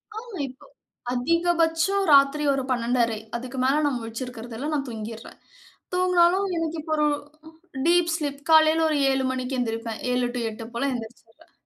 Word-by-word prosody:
ஆ -, -, -3 dB, 0.3 s
இப்போ 255 Hz, 0 st, -14 dB, 0.5 s
அதிகபட்சம் 335 Hz, +6 st, +1 dB
ராத்திரி 280 Hz, +1 st, +5 dB
ஒரு 270 Hz, -1 st, -1 dB
12்:30 235 Hz, -2 st, +1 dB, 0.2 s
அதுக்கு 255 Hz, +2 st, -6 dB
மேல 280 Hz, +3 st, +3 dB
நான் 280 Hz, -3 st, 0 dB
முழிச்சிருக்குறதில்ல, 235 Hz, +2 st, -6 dB
நான் 285 Hz, -2 st, -1 dB
தூங்கிர்றேன். 225 Hz, 0 st, -8 dB, 0.6 s
தூங்குனாலும் 360 Hz, +1 st, +3 dB
எனக்கு 330 Hz, 0 st, -2 dB
இப்போ 315 Hz, +1 st, -3 dB
ஒரு 300 Hz, 0 st, +3 dB, 0.8 s
டீப் 340 Hz, 0 st, +3 dB
ஸ்லீப் 285 Hz, -3 st, -4 dB
காலைல 315 Hz, 0 st, +6 dB
ஒரு 305 Hz, -, +1 dB
7:00 265 Hz, 0 st, 0 dB
மணிக்கு 260 Hz, 0 st, -3 dB
எந்திரிப்பேன். 225 Hz, -1 st, -3 dB
7:00 250 Hz, 0 st, +1 dB
டூ 245 Hz, -, -2 dB
8:00 220 Hz, +1 st, -8 dB
போல 275 Hz, +4 st, 0 dB
எந்திரிச்சுருவேன். 240 Hz, +5 st, -10 dB
275 Hz, 145 wpm, -25 LUFS, 240-325 Hz, 0.8 s, காலைல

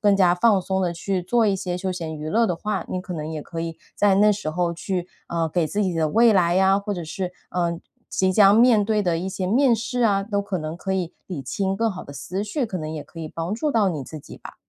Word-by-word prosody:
更 205 Hz, -2 st, +4 dB
加 180 Hz, -2 st, +4 dB
放 200 Hz, +2 st, +4 dB
松 190 Hz, 0 st, -1 dB
地 180 Hz, -2 st, +1 dB
去 185 Hz, +1 st, -2 dB
做 225 Hz, +4 st, +2 dB
一 200 Hz, -, +2 dB
些 180 Hz, -1 st, -3 dB
休 185 Hz, 0 st, -2 dB
闲 160 Hz, -3 st, -5 dB
娱 155 Hz, +1 st, -5 dB
乐 230 Hz, +1 st, +3 dB
的 175 Hz, -, -1 dB
话， 210 Hz, 0 st, -3 dB
你 185 Hz, -, -2 dB
可 180 Hz, 0 st, -7 dB
能 155 Hz, -2 st, -4 dB
也 155 Hz, -2 st, -5 dB
可 165 Hz, -1 st, -6 dB
以 165 Hz, -1 st, -4 dB, 0.2 s
在 205 Hz, -2 st, +3 dB
那 210 Hz, +1 st, +5 dB
时 200 Hz, -6 st, -4 dB
候 170 Hz, +1 st, 0 dB
去， 180 Hz, +1 st, -3 dB, 0.2 s
呃， 165 Hz, -1 st, 0 dB
给 170 Hz, -1 st, +1 dB
自 205 Hz, +6 st, -1 dB
己 185 Hz, -2 st, 0 dB
的 160 Hz, -1 st, +1 dB
未 230 Hz, +6 st, +5 dB
来 180 Hz, -1 st, +3 dB
啊， 195 Hz, +1 st, +4 dB
或 205 Hz, 0 st, -3 dB
者 175 Hz, -2 st, -5 dB
是， 180 Hz, +3 st, -4 dB, 0.2 s
嗯 170 Hz, -1 st, 0 dB, 0.3 s
即 190 Hz, 0 st, +1 dB
将 200 Hz, +1 st, +6 dB
面 230 Hz, -3 st, +6 dB
对 215 Hz, -2 st, +2 dB
的 170 Hz, -3 st, +1 dB
一 185 Hz, +2 st, -3 dB
些 185 Hz, -1 st, -3 dB
面 240 Hz, +3 st, +4 dB
试 245 Hz, +3 st, -3 dB
啊， 200 Hz, -3 st, +3 dB
都 200 Hz, -1 st, -1 dB
可 200 Hz, -2 st, -3 dB
能 155 Hz, 0 st, -4 dB
可 190 Hz, +2 st, -3 dB
以 180 Hz, -3 st, -2 dB
理 165 Hz, -8 st, -5 dB
清 195 Hz, +8 st, -2 dB
更 225 Hz, 0 st, +1 dB
好 185 Hz, -, -7 dB
的 -, -, -11 dB
思 185 Hz, +8 st, -4 dB
绪， 240 Hz, +6 st, -2 dB
可 195 Hz, -5 st, -4 dB
能 155 Hz, 0 st, -5 dB
也 155 Hz, -2 st, -5 dB
可 165 Hz, -, -11 dB
以 155 Hz, -, -5 dB
帮 165 Hz, +6 st, -3 dB
助 295 Hz, +6 st, -1 dB
到 210 Hz, -6 st, +3 dB
你 150 Hz, -5 st, -4 dB
自 155 Hz, +4 st, -8 dB
己 -, -, -12 dB
吧。 -, -, -11 dB
185 Hz, 295 characters per minute, -23 LUFS, 170-205 Hz, 0.3 s, 将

